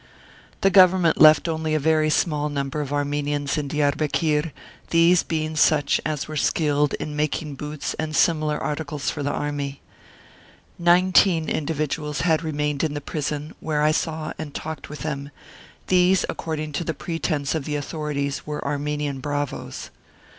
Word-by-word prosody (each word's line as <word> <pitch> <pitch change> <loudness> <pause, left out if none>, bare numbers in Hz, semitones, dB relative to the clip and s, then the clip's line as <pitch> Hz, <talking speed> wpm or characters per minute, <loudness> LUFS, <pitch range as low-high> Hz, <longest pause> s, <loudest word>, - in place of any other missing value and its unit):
The 195 - +4
Government 185 -3 +5
left 155 +2 +7
only 160 -1 -1
a - - +2
very 155 +1 +2
small 150 -1 +1
number 140 0 -2
of 140 -1 -5
Armenians 145 0 -1
in 150 -2 -2
Diarbekir, 150 +2 0 0.4
these 170 +1 +5
being 155 -1 -3
such 150 -2 +3
as 150 -2 -2
were 155 - -6
skilled 150 -1 +1
in 150 - -5
making 150 0 -1
boots 150 +1 -5
and 155 0 -2
similar 155 -1 +2
articles 150 -1 -3
for 150 - -5
the 145 - -1
army. 145 -1 -3 1.0
Nineteen 175 -1 +4
individuals 150 -1 -2
had 160 -2 +2
remained 150 -2 -2
in 150 -2 -1
the - - -2
prison, 150 +1 -4
where 150 -2 -1
I 155 - +4
saw 155 0 -2
and 150 -2 -6
talked 160 -2 -6
with 150 -2 -8
them; 140 -1 -4 0.6
these, 185 +1 +3
according 155 -1 -4
to 150 - -2
the 165 -2 -3
pretence 155 -2 -2
of 155 -4 -2
the 150 - -2
authorities, 145 -1 -3
were 150 0 -5
Armenian 145 -1 -2
bravoes. 145 0 -4
150 Hz, 155 wpm, -23 LUFS, 145-160 Hz, 1.0 s, left